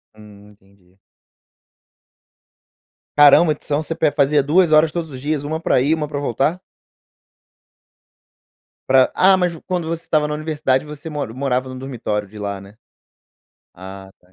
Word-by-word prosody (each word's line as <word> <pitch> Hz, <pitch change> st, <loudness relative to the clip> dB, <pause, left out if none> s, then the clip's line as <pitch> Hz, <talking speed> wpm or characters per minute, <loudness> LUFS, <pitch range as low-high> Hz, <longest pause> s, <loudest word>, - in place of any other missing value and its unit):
Hum, 105 Hz, -1 st, -16 dB
entendi. 95 Hz, -2 st, -25 dB, 2.2 s
Caramba. 145 Hz, +2 st, +6 dB
Então, 145 Hz, 0 st, -3 dB
você 165 Hz, +1 st, -5 dB
pe 155 Hz, -3 st, +1 dB
fazia 145 Hz, 0 st, +2 dB
2 165 Hz, +4 st, +3 dB
horas 155 Hz, +1 st, +5 dB
todos 165 Hz, -1 st, -4 dB
os 130 Hz, -, -8 dB
dias, 145 Hz, 0 st, -2 dB
1 160 Hz, +2 st, -3 dB
pra 165 Hz, -, +1 dB
ir 140 Hz, +4 st, +1 dB
e -, -, +4 dB
1 150 Hz, -2 st, -4 dB
pra 145 Hz, -1 st, -5 dB
voltar? 140 Hz, +6 st, -1 dB, 2.3 s
Pra 130 Hz, -1 st, +4 dB
ah, 190 Hz, +1 st, +5 dB
mas 180 Hz, -2 st, 0 dB
quando 180 Hz, -3 st, -3 dB
você 165 Hz, 0 st, -4 dB
estava 150 Hz, -1 st, 0 dB
na 150 Hz, -, -3 dB
universidade 150 Hz, -3 st, -1 dB
você 150 Hz, +1 st, -9 dB
mora 145 Hz, -7 st, -5 dB
morava 130 Hz, 0 st, -2 dB
no 130 Hz, -, -8 dB
dormitório 115 Hz, -6 st, -4 dB
de 105 Hz, +2 st, -14 dB
lá, 100 Hz, -1 st, -5 dB
né? 100 Hz, +2 st, -15 dB, 1.0 s
Ah 95 Hz, +1 st, -11 dB
tá. 90 Hz, +1 st, -30 dB
145 Hz, 155 wpm, -19 LUFS, 105-155 Hz, 2.3 s, Caramba